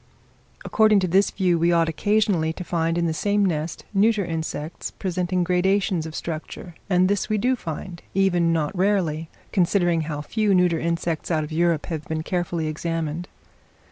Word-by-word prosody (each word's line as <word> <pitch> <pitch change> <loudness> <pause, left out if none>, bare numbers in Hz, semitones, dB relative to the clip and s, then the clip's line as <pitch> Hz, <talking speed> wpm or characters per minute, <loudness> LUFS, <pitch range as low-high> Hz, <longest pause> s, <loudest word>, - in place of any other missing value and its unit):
According 215 -2 +4
to 185 - +1
this 190 +3 +3
view 180 -3 +1
we 170 +1 +3
ought 165 -1 +3
occasionally 195 -1 +1
to 180 - -7
find 165 -1 -1
in 170 - +1
the 165 - 0
same 205 +6 +1
nest 160 -3 -2
neuter 210 0 +3
insects, 160 -1 -4
presenting 180 -1 -1
gradations 180 -1 +1
of 160 - -8
structure; 165 +1 -6 0.2
and 180 -1 +4
this 205 +2 0
we 215 - +1
do 250 +5 +2
find, 170 -3 -7
even 175 -3 +3
not 160 +2 -1
rarely, 175 -5 0 0.2
considering 175 -2 +2
how 150 -1 -4
few 210 +3 +1
neuter 180 -2 +3
insects 170 -1 -2
out 160 -3 +1
of 150 - -7
Europe 165 -1 +1
have 155 -3 -5
been 160 0 -2
carefully 175 -2 -2
examined. 165 +1 -3
175 Hz, 170 wpm, -23 LUFS, 160-190 Hz, 0.2 s, According